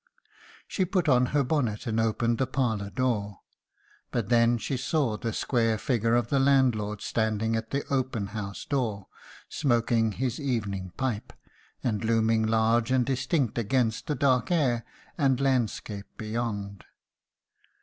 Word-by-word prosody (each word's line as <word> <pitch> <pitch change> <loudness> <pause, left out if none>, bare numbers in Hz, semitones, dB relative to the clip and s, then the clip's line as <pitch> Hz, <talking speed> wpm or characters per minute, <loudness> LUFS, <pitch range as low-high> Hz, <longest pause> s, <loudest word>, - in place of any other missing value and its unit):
"She 190 - 0
put 185 -2 0
on 125 -2 +4
her 145 +1 +1
bonnet 125 -7 -1
and 115 -1 0
opened 115 +1 +1
the 130 - +1
parlour 115 -7 -1
door; 105 -5 -1 0.7
but 115 -4 -2
then 120 0 +4
she 130 - -3
saw 130 -3 0
the 115 +2 -3
square 115 -1 +1
figure 115 0 +1
of 120 -1 +1
the 140 - +2
landlord 125 -7 +2
standing 110 0 0
at 110 0 -3
the 140 +1 -2
open 130 -6 0
house 100 -3 -5
door, 110 -8 -1 0.4
smoking 115 -4 +1
his 130 +2 -2
evening 100 -9 -2
pipe, 125 -6 -2 0.5
and 110 -4 -1
looming 110 0 +2
large 115 +1 +2
and 130 -1 +3
distinct 130 -1 0
against 115 0 0
the 150 - 0
dark 130 -4 +2
air 130 -9 +1 0.4
and 135 -3 +3
landscape 120 -6 -1
beyond. 110 -3 -4
115 Hz, 140 wpm, -27 LUFS, 110-130 Hz, 0.7 s, on